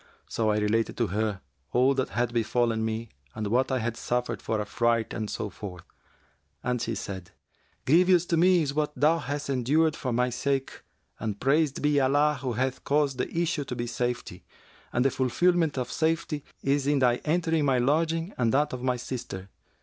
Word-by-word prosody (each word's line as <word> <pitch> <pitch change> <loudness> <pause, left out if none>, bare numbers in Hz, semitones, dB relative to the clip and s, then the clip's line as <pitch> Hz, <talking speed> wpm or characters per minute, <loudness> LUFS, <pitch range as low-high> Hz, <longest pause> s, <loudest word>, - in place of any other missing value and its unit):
So 110 -1 0
I 105 - +2
related 105 +2 0
to 115 - +1
her 105 -2 -1 0.3
all 130 +3 +4
that 130 -1 -1
had 120 0 -1
befallen 115 -1 +1
me 110 0 -3 0.3
and 110 -1 -3
what 125 +6 +1
I 130 - +2
had 115 -1 -2
suffered 125 +1 -2
for 110 - -1
affright 115 +2 0
and 110 -2 -3
so 105 -3 -4
forth; 90 -3 -8 0.8
and 125 -1 -1
she 115 - -2
said, 95 -3 -6 0.6
'Grievous 175 +4 +5
to 170 - +3
me 175 0 +4
is 140 -2 -2
what 150 0 -1
thou 160 +3 +3
hast 145 +1 -4
endured 145 +5 +2
for 130 - -3
my 125 +1 +1
sake 135 +2 -2 0.4
and 105 -2 -3
praised 145 +1 +1
be 150 -1 +3
Allah 145 +2 +3
who 130 -3 -2
hath 130 +3 -2
caused 145 -2 +1
the - - -1
issue 165 -3 0
to 125 - -5
be 120 - -3
safety, 120 +1 -3 0.5
and 125 +2 +1
the 135 - +4
fulfilment 165 +4 +2
of 125 -1 -2
safety 160 -2 -1 0.2
is 140 0 +1
in 145 0 +3
thy 125 -2 +3
entering 160 0 0
my 135 -2 +3
lodging 165 +7 +1
and 115 -2 +2
that 145 +3 +2
of 125 - -4
my 125 -1 +1
sister.' 115 -6 -6
130 Hz, 190 wpm, -27 LUFS, 115-150 Hz, 0.8 s, Grievous